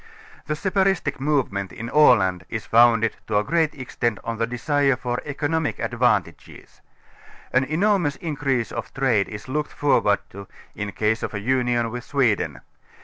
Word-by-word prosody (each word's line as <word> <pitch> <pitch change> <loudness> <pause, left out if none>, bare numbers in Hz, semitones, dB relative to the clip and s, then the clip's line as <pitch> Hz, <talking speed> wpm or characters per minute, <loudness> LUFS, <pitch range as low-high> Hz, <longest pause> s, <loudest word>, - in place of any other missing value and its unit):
/ - - -22
The 150 - -1
separatistic 190 -1 0
movement 130 -9 -1
in 115 - -7
Aland 100 -11 +4
is 110 -2 -4
founded 115 -1 +4
to 105 - +1
a 105 - +2
great 165 +4 +1
extent 120 -4 -2
on 115 -1 -4
the 115 - +1
desire 135 +3 +1
for 125 -1 -3
economic 150 +2 -1
advantages. - - -2 0.7
An 130 +1 +3
enormous 175 -1 +1
increase 140 -8 -2
of - - -5
trade 120 -7 +1
is 105 +2 -8
looked 150 +3 -2
forward 105 -8 +2
to, 100 0 -10 0.3
in 105 -1 -5
case 110 +2 0
of - - -4
a - - -2
union 120 0 0
with 120 0 -6
Sweden. 110 - 0
125 Hz, 155 wpm, -23 LUFS, 110-145 Hz, 0.7 s, Aland